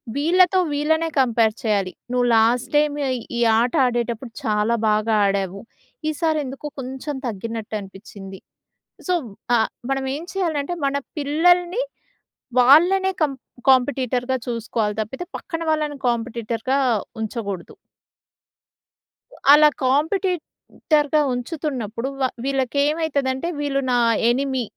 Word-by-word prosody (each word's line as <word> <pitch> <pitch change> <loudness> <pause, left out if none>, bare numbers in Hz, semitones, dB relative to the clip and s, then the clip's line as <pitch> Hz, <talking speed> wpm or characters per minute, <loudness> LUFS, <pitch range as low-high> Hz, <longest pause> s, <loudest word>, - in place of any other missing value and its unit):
వీళ్ళతో 360 +5 +4
వీళ్ళనే 320 +3 +1
కంపేర్ 230 -4 +3
చేయాలి. 200 -4 0 0.2
నువ్వు 250 0 +2
లాస్ట్‌టైమ్ 250 +6 +2 0.4
ఈ - - 0 0.2
ఆట 240 +1 +1
ఆడేటప్పుడు 240 0 -2
చాలా 215 +2 +1
బాగా 215 +1 +1
ఆడావు 195 -1 -1 0.5
ఈసారెందుకో 300 -3 -2
కొంచెం 265 +3 -5
తగ్గినట్టు 225 +1 -5
అనిపిచ్చింది. 195 -1 -11 0.7
సో 365 - +2 0.4
ఆహ్, 220 - +1 0.2
మనం 270 0 -1
ఏం 310 - -6
చేయాలంటే 340 -4 -1
మన 275 0 0 0.2
పిల్లల్ని 350 - +2 0.8
వాళ్ళనే 355 +9 +5
కం 300 -3 +3 0.4
కాంపిటీటర్‌గా 260 -1 +2
చూసుకోవాలి 225 -3 -2
తప్పితే 265 +11 -6
పక్కన 330 -1 -6
వాళ్ళని 300 -2 -1
కాంపిటీటర్‌గా 235 +2 -1 0.4
ఉంచగూడదు. 200 -5 -5 1.8
అలా 300 +1 +8 0.2
కాంపిటీటర్‌గా 305 -1 0
ఉంచుతున్నప్పుడు 245 -4 -4
వ - - +2 0.2
వీళ్ళకెమైతదంటే 280 +1 0
వీళ్ళు 275 -1 0
నా - - +3 0.3
ఎనిమీ. 260 0 0
265 Hz, 95 wpm, -22 LUFS, 230-300 Hz, 1.8 s, అలా